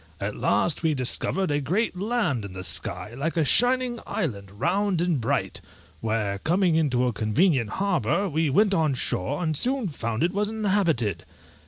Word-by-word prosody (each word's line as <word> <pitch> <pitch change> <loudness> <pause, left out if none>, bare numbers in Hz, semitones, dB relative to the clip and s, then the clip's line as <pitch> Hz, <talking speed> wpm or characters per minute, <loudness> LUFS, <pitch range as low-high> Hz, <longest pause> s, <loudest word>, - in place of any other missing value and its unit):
At 100 +1 -3
last 165 - +1
we 160 -2 +1
discovered 150 +7 0
a 145 0 +1
great 185 - 0
land 195 - -1
in 100 -2 -8
the 95 0 -6
sky, 95 +5 -4
like 155 +7 -3
a 160 - +3
shining 245 - +3
island, 100 -10 -3
round 175 - 0
and 170 -6 +1
bright, 115 - -1 0.4
where, 105 -3 -1
coming 175 - +2
into 130 -6 +2
a 125 - 0
convenient 115 - +2
harbour, 195 - 0
we 160 -2 0
went 200 +8 +3
on 155 -6 +2
shore, 130 - -2
and 155 -2 0
soon 250 - 0
found 115 -5 -3
it 175 - +1
was 205 +1 0
inhabited. 195 - 0
160 Hz, 170 wpm, -25 LUFS, 115-195 Hz, 0.4 s, a